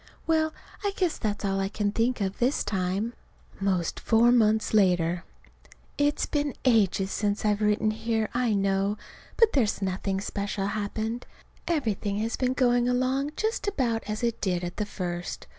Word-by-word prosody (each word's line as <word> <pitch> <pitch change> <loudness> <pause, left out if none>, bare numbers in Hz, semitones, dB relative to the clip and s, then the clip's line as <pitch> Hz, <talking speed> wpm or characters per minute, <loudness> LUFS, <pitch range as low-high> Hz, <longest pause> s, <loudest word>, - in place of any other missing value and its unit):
Well, 315 -1 +2 0.3
I 405 -1 0
guess 360 -4 0
that's 210 -2 -2
all 195 0 0
I 195 0 0
can 205 0 -1
think 230 +2 0
of 195 0 -2
this 255 +4 +2
time. 195 +3 -1 0.5
'Most 185 -4 0
four 230 +1 +4
months 220 -3 +3
later. 180 -4 +3 0.7
It's 290 0 +1
been 290 -1 -1
ages 200 -5 +3
since 205 0 -1
I've 210 0 +2
written 210 +1 +2
here, 220 0 -1
I 240 -3 +1
know. 195 +1 +1 0.4
But 455 -2 +5
there's 235 -7 +2
nothing 190 0 -1
special 200 0 -3
happened. 215 +3 -3 0.4
Everything 220 - -1
has 225 +2 -1
been 255 0 0
going 245 -2 +3
along 260 +4 0
just 440 -1 -1
about 245 - 0
as 215 +3 -3
it 235 -1 -1
did 180 -3 0
at 175 0 -5
the 210 - -1
first. 175 -3 -4
215 Hz, 160 wpm, -27 LUFS, 195-245 Hz, 0.7 s, But